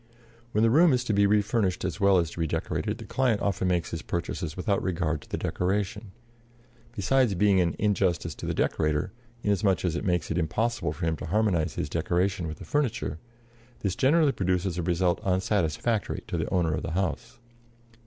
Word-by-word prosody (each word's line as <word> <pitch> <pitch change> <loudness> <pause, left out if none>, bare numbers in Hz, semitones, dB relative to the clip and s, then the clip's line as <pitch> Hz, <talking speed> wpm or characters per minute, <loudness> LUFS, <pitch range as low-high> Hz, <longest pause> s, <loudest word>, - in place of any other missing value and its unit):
When 105 0 +2
the 115 - +4
room 160 +3 +6
is 125 0 +1
to 115 - -1
be 100 0 +4
refurnished 105 -2 +1
as - - -3
well 100 -1 +5
as 85 -2 -1
redecorated 85 +6 -2
the 115 - -9
client 120 0 +1
often 95 -2 0
makes 90 -2 0
his 85 - -4
purchases 85 -1 -4
without 100 +2 0
regard 85 -5 -1
to - - -17
the - - -2
decoration. 100 +3 -2 0.9
Besides 120 +1 +2
being 100 +1 +4
an 85 -2 0
injustice 100 -4 0
to - - -7
the - - -1
decorator, 75 -1 0 0.3
inasmuch 100 -2 +1
as 85 -2 0
it - - -3
makes 90 -4 0
it 85 - 0
impossible 105 +3 -1
for 80 +3 -4
him 80 -1 0
to - - -6
harmonize 90 -4 +1
his - - -2
decoration 90 0 0
with 80 -1 -6
the - - -10
furniture, 120 - -1 0.6
this 95 -2 -1
generally 150 +2 +4
produces 90 -4 -1
a 90 - -2
result 85 +1 +1
unsatisfactory 95 +2 0
to - - -2
the - - -2
owner 85 -4 +1
of - - -2
the 80 - -4
house. 100 +6 -2
95 Hz, 185 wpm, -27 LUFS, 85-105 Hz, 0.9 s, room